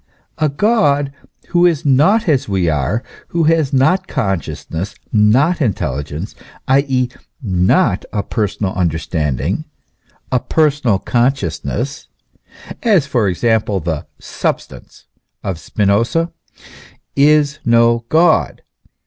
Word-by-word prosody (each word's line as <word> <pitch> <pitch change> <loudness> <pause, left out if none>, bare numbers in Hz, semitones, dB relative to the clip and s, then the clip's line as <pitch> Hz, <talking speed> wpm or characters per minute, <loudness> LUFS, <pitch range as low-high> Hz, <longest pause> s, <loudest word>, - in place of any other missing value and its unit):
A. 155 -1 +2
God 145 -6 +1 0.4
who 175 -1 +2
is 160 -5 -1
not 160 - +3
as 140 -8 +1
we 95 -3 0
are, 80 - 0 0.2
who 170 -1 0
has 160 -3 +2
not 180 +8 +2
consciousness, 90 -1 -3 0.2
not 130 +11 +3
intelligence, 80 - -2 0.3
i.e., 130 -2 +2 0.3
not 95 - +1
a 100 - -2
personal 105 -3 -2
understanding, 80 - -1 0.7
a 125 - +2
personal 145 -7 +1
consciousness, 135 +4 -2 0.7
(as, 200 - +3
for 120 -6 0
example, 105 +1 +1
the 80 -2 -4
"substance" - - -5 0.4
of 95 -5 -3
Spinoza,) 115 - 0 0.8
is 145 0 +3
no 115 0 +3
God. 160 +1 +2
125 Hz, 100 wpm, -17 LUFS, 95-150 Hz, 0.8 s, not